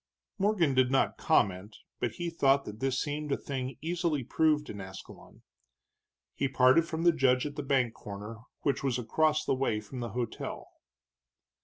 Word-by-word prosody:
Morgan 195 -8 +2
did 130 -1 +3
not 135 - +1
comment, 100 +2 +1 0.2
but 120 - -1
he 175 -1 -4
thought 140 -4 +3
that 105 +1 -8
this 135 0 0
seemed 150 0 -3
a - - +2
thing 130 -2 -5
easily 165 -4 -1
proved 150 +3 +2
in 100 - -7
Ascalon. 95 0 -12 0.9
He 140 - 0
parted 130 +5 +4
from 165 0 -3
the 175 - +6
judge 130 -4 +2
at 145 -1 -5
the 145 - -3
bank 135 -4 +1
corner, 105 +2 -8 0.2
which 140 - 0
was 130 -3 +1
across 155 +6 +1
the - - +2
way 130 -5 0
from 110 +5 -8
the 120 -1 -3
hotel. 120 +1 -5
135 Hz, 170 wpm, -30 LUFS, 120-150 Hz, 0.9 s, the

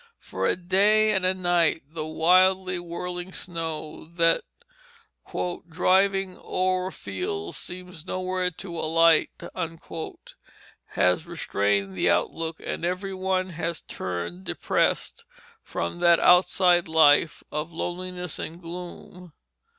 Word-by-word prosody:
For - - -3
a - - +2
day 205 +4 +3
and 190 -3 +2
a 185 - +2
night 175 -4 +2
the 155 -1 -4
wildly 185 +3 +3
whirling 175 +1 -5
snow 160 -4 -5
that 165 -1 +3 1.3
"driving 195 +3 +2
o'er 185 0 0
the - - -12
fields 85 -4 -4
seems 180 -2 -8
nowhere 185 0 -1
to 170 -1 -7
alight" 165 0 +4 1.6
has 90 - +1
restrained 100 - -1
the 90 - +2
outlook, 160 - 0
and - - -4
every 185 +3 -2
one 185 0 -1
has 170 0 -3
turned 90 0 -5
depressed - - -1 0.4
from 85 - -4
that 170 -1 +5
outside 180 -1 +4
life 160 -1 +4
of 150 +3 -3
loneliness 180 0 -4
and 165 +2 -6
gloom. 180 0 -9
175 Hz, 110 wpm, -26 LUFS, 160-185 Hz, 1.6 s, that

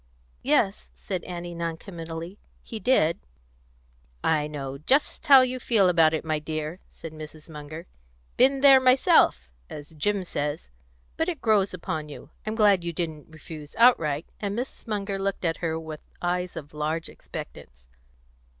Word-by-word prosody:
"Yes," - - +1
said 180 - -5
Annie 175 -1 -6
non 165 -1 -3
committally, 165 +1 -8 0.2
"he 225 - -7
did." 210 -10 +2 1.0
"I 150 -2 +2
know 140 -2 -6
just 275 - +1
how 275 -2 +9
you 255 0 0
feel 215 -6 +3
about 165 -2 +4
it, 160 - -4
my 155 -1 0
dear," 155 +2 -4
said 165 -1 -10
Mrs. 155 0 -10
Munger. 155 +1 -9 0.5
"'Been 270 +1 +4
there 275 -1 +8
myself,' 255 - +4 0.2
as 150 +2 -9
Jim 190 +6 -1
says. 145 - -4 0.5
But 325 +2 0
it 335 -5 -4
grows 210 -3 +2
upon 160 -4 -4
you. 145 - -11 0.2
I'm 215 - -1
glad 205 -5 +4
you 170 - -2
didn't 160 -3 -5
refuse 155 -1 -11
outright;" 165 - +4
and 205 0 -3
Mrs. 250 0 -6
Munger 200 -2 -2
looked 195 -1 -2
at 165 -1 0
her 160 -1 -2
with 160 -1 -8 0.2
eyes 180 0 -2
of 145 -1 -8
large 155 +2 -2
expectance. - - -10
165 Hz, 155 wpm, -26 LUFS, 155-205 Hz, 1.0 s, how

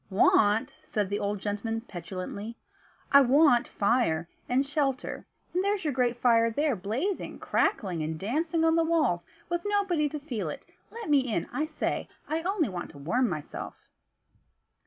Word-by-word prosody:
"Want?" 205 +2 +3
said 205 -3 -2
the 205 - 0
old 205 +1 -1
gentleman, 210 +3 -3
petulantly, 200 +3 -6 0.5
"I 280 - +9
want 270 -1 +5
fire, 200 -7 +1 0.2
and 260 +3 +2
shelter; 275 -2 -2 0.3
and 365 +2 +1
there's 400 -1 0
your 300 -3 0
great 245 -2 +1
fire 230 -2 +4
there 285 +3 +1
blazing, 240 - -3
crackling, 180 -6 0
and 155 +1 -3
dancing 320 - 0
on 325 0 +4
the 330 - +4
walls, 320 - +2 0.3
with 345 0 -1
nobody 395 -7 +1
to 300 +1 -5
feel 235 - -4
it - - -7 0.2
Let 460 -2 -7
me 290 -2 +5
in, 230 -10 -1
I 305 +1 0
say; 310 - -2 0.2
I 315 +2 -1
only 360 -3 +1
want 180 -4 -5
to - - -12
warm 230 - +1
myself." 155 -4 -5
245 Hz, 160 wpm, -28 LUFS, 205-310 Hz, 0.5 s, I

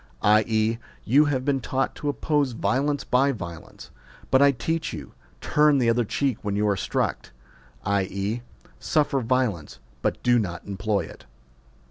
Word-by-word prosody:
i.e. 110 +2 +3 0.3
you 140 +7 +5
have 130 -3 -1
been 135 -2 +1
taught 135 +1 -1
to 145 - -3
oppose 145 -2 0
violence 135 +7 0
by 135 +3 +2
violence, 85 -9 -9 0.4
but 130 - +5
I 140 0 +7
teach 155 +6 -2
you: - - -8 0.3
turn 150 -1 +3
the 120 -3 +3
other 120 +1 +2
cheek 135 +1 -1
when 100 -2 -2
you 105 +1 +1
are 100 - +2
struck; 95 - -2 0.6
i.e. 100 +3 -1 0.4
suffer 145 -3 +1
viol 125 -5 +1
ence, 75 - -13 0.2
but - - -2
do 120 -1 +4
not 85 -6 -4
employ 100 +1 -1
it. - - -11
120 Hz, 155 wpm, -25 LUFS, 105-140 Hz, 0.6 s, I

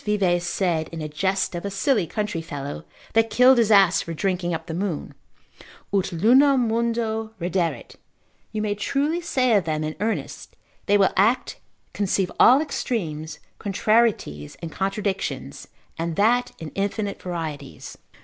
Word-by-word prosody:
Vives 185 -4 +1
said 175 -4 0
in 165 - -6
a 155 - -4
jest 190 +6 -1
of 175 - -5
a 200 - -2
silly 200 - +1
country 210 -4 -3
fellow, 145 -3 -6 0.3
that 225 0 +3
killed 250 +3 +5
his 225 -2 +3
ass 195 -4 +5
for 165 - -6
drinking 180 -1 -1
up 165 -1 -3
the 165 - -6
moon, 175 -3 -3 0.8
ut 195 -1 +1
lunam 250 - +4
mundo 225 -1 -1
redderet, 170 -6 -2 0.5
you 215 -1 -2
may 210 -1 0
truly 285 +10 -1
say 255 -8 +1
of 195 -5 +2
them 155 -1 -1
in 155 0 -3
earnest; 220 +2 -4 0.3
they 205 - +5
will 195 -1 +3
act, 220 +6 +2 0.3
conceive 195 -2 0
all 260 +4 +7
extremes, 160 - -3 0.2
contrarieties, 205 - 0
and 165 - -7
contradictions, 195 0 -3 0.3
and 165 0 -2
that 235 +6 +2
in 160 -2 -8
infinite 200 +1 -2
varieties. 160 -6 -6
195 Hz, 150 wpm, -23 LUFS, 170-225 Hz, 0.8 s, all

